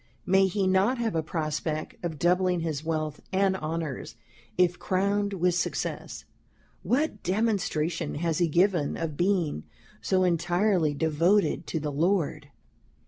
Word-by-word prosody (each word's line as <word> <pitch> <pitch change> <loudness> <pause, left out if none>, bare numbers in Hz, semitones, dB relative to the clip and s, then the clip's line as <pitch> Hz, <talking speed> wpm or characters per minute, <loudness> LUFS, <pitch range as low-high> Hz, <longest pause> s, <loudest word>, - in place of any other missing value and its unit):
May 190 +1 +4
he 195 +1 0
not 190 +7 +3
have 230 -2 -1
a 165 - +1
prospect 155 0 -3
of 165 -3 -3
doubling 180 +1 +2
his 155 -3 -3
Wealth 155 -2 -2
and 190 0 +2
Honours, 160 -5 -4 0.4
if 175 -1 +2
crowned 200 +2 0
with 180 -1 +1
Success? 175 - -3 0.6
What 270 -4 0
Demonstration 180 -6 -1
has 165 0 -1
he 175 - +3
given 170 -2 +2
of 165 -3 -3
being 175 - 0 0.4
so 185 -1 +2
entirely 175 -1 +2
devoted 165 +7 +2
to 160 - -2
the 150 -1 -3
Lord? 170 +3 0
175 Hz, 135 wpm, -27 LUFS, 155-190 Hz, 0.6 s, May